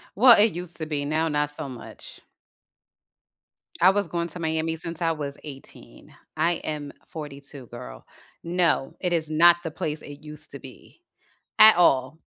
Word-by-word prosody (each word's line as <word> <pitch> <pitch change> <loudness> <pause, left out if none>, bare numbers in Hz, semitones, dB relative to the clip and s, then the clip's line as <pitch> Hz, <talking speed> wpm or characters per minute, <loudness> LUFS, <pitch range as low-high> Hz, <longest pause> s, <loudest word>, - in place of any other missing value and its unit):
Well, 240 +1 +7
it 210 -2 +4
used 175 0 -6
to 160 - -4
be, 145 -2 -3
now 155 +3 0
not 150 -1 0
so 145 -1 -5
much. 125 -3 -11 1.6
I 180 +2 +7
was 200 -2 0
going 170 +1 -3
to 180 - -2
Miami 160 0 -1
since 165 0 -3
I 165 -1 +1
was 145 -2 -5
18, 135 -3 -11 0.2
I 165 +3 +2
am 150 -3 -5 0.2
42, 140 -4 -9
girl, 60 - -11 0.4
no, 170 -5 0
it 180 -2 -1
is 155 -2 0
not 170 +2 +6
the 165 - -4
place 150 0 -3
it 145 +1 -12
used 150 0 -5
to 140 - -8
be 135 - -15 0.6
at 215 -2 +9
all. 140 -4 +2
155 Hz, 165 wpm, -25 LUFS, 145-170 Hz, 1.6 s, at